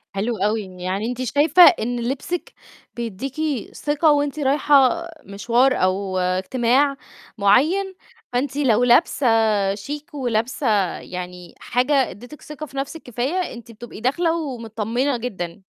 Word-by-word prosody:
حلو 220 +3 -1
أوي، 210 +3 0 0.2
يعني 195 +4 -2
أنتِ 250 +1 -4
شايفة 295 +7 +5
إن 245 -8 +4
لبسِك 270 +8 -4 0.4
بيدّيكِ 235 +3 -5 0.4
ثقة 295 +1 +2
وأنتِ 290 +1 0
رايحة 290 +3 +3 0.2
مشوار 235 +6 +2
أو 185 0 0
اجتماع 240 +10 +1 0.4
معيّن، 320 - +2 0.4
فأنتِ 265 +2 -1
لو 245 -5 +3
لابسة 250 +1 +3 0.5
شيك 290 +10 -8
ولابسة 245 -1 -1 0.3
يعني 180 -1 -8
حاجة 255 +4 0 0.2
ادّتِك 245 +10 -12
ثقة 300 0 -8
في 275 -1 -12
نفسِك 280 +4 -5
كفاية، 265 +10 -2
أنتِ 235 -1 -11
بتبقي 230 -1 -11
داخلة 325 +7 +1
ومتطمنة 240 -1 -2
جدًا. 190 -7 -6
250 Hz, 120 wpm, -21 LUFS, 220-290 Hz, 0.5 s, شايفة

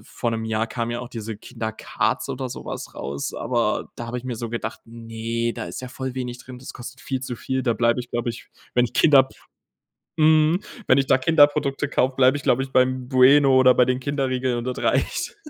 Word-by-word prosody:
vor 120 - -3
'nem 110 -1 -3
Jahr 110 0 -1
kam 115 0 -3
ja 120 0 -3
auch 125 - -8
diese 110 -2 -6
Kinder 115 -1 -5
Cards 110 - -2
oder 130 0 -4
so - - -8
was - - -6
raus, 70 +1 -4
aber 115 -3 -1
da 120 - -6
habe 120 +2 -4
ich 125 - -11
mir 125 -2 -4
so 115 0 -5
gedacht: 115 -1 -4
„Ne, 115 0 -4
da - - -5
ist - - -7
ja 130 - -7
voll 130 0 -5
wenig 125 -2 -4
drin, 125 0 -11
das 130 - -10
kostet 130 +2 -9
viel 130 -2 -3
zu 125 -2 -5
viel.“ 130 +3 -2
Da 120 - +1
bleibe 120 +1 +1
ich, 125 - -10
glaube 120 0 -2
ich, 115 - -6 0.3
wenn 125 0 +4
ich 120 - -5
Kinder 145 0 +5
habe 130 0 +4 0.9
mhm, 155 +3 +4 0.3
wenn - - +5
ich 135 -1 +2
da - - +5
Kinderprodukte 145 -1 +3
kaufe, 130 -2 +1
bleibe 130 +1 +4
ich, 145 - -9
glaube 130 +2 +2
ich, 135 - -9
beim 130 0 +1
Bueno 135 +1 +6
oder 130 -1 +6
bei 125 - +4
den 125 0 0
Kinderriegeln 130 -2 -1
und 120 - -3
das 125 0 -4
reicht. - - 0
125 Hz, 230 wpm, -23 LUFS, 115-130 Hz, 0.9 s, Bueno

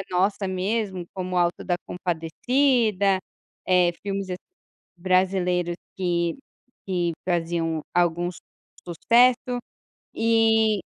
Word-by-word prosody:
é 195 - -5
nossa 195 +2 +1
mesmo, 190 -1 -2
como 185 -1 -3
O - - +4
Auto 175 0 0
da 175 -2 0
Compadecida. 200 - +1 0.5
Eh, 180 -2 +4
filmes 195 -1 -3
assim, 180 - -2 0.6
brasileiros 180 -1 +1 0.2
que 170 -2 0 0.5
que 175 -3 0 0.2
faziam 165 -2 -1
algum 175 0 +2
s 180 - -8 0.5
sucesso 245 - +3 0.6
e 225 -2 +3
185 Hz, 105 wpm, -24 LUFS, 175-210 Hz, 0.6 s, O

